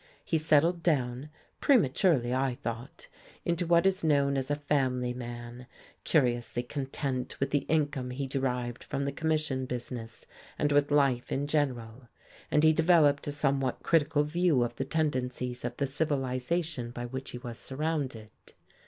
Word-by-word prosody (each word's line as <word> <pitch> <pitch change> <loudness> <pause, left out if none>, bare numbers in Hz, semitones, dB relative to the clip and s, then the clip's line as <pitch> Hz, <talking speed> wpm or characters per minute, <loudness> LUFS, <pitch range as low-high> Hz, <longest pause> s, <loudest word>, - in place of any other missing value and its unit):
He 160 - +1
settled 160 +3 +3
down 135 -4 0 0.3
prematurely, 145 - +3
I 130 -1 0
thought 120 0 -6 0.4
into 170 0 0
what 170 +1 +4
is 190 -2 +2
known 140 -3 +3
as 135 0 -2
a 145 - +2
family 130 -4 0
man, 120 0 -8 0.4
curiously 120 -4 +1
content 135 -1 -3
with 135 0 -1
the 145 -2 0
income 145 -5 0
he 135 +2 -3
derived 125 -3 -2
from 140 - -3
the 140 - -1
commission 155 -3 -1
business 120 -2 -6 0.3
and 150 - +1
with 145 0 +3
life 140 -4 +2
in 140 +1 0
general; 130 -5 -2 0.4
and 150 - +3
he 160 0 +6
developed 155 -4 +4
a - - -1
somewhat 135 -3 0
critical 150 -2 +3
view 155 -3 +2
of 120 - -3
the 135 - -3
tendencies 125 -5 -2
of 120 0 -4
the 140 - +1
civilization 140 0 -1
by 120 0 -6
which 130 +2 -5
he - - -6
was 120 -1 -8
surrounded. 135 -6 -3
135 Hz, 155 wpm, -29 LUFS, 125-150 Hz, 0.4 s, he